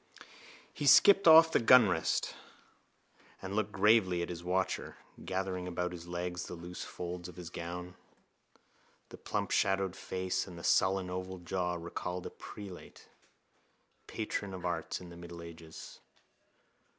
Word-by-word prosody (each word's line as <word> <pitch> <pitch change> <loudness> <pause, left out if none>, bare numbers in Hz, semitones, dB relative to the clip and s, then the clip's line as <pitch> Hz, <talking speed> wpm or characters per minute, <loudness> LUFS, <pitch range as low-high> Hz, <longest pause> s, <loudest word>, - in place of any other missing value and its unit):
He 145 - -3
skipped 200 +6 +7
off 160 0 +9
the - - +3
gunrest 110 -9 +4 1.1
and 95 +1 -6
looked 110 0 0
gravely 95 -4 +3
at - - -5
his 85 -1 -6
watcher, 95 +1 -1 0.3
gathering 95 -1 -3
about 90 0 -2
his 85 -1 -9
legs 90 0 -4
the - - -6
loose 85 +1 -7
folds 90 0 -6
of 90 - -12
his 85 -1 -8
gown. 90 +1 -6 1.2
The - - -11
plump - - -3
shadowed 95 -1 +1
face 95 +1 -3
and 85 -2 -9
sullen 95 -1 +2
oval 95 +1 -5
jowl 90 0 -2
recalled 90 +1 -5
a - - -6
prelate, 100 -4 -11 1.0
patron 100 -3 -4
of 90 -1 -7
arts 85 -2 -2
in 90 - -10
the 85 - -11
middle 85 -1 -9
ages. 85 -1 -11
90 Hz, 140 wpm, -32 LUFS, 85-95 Hz, 1.2 s, off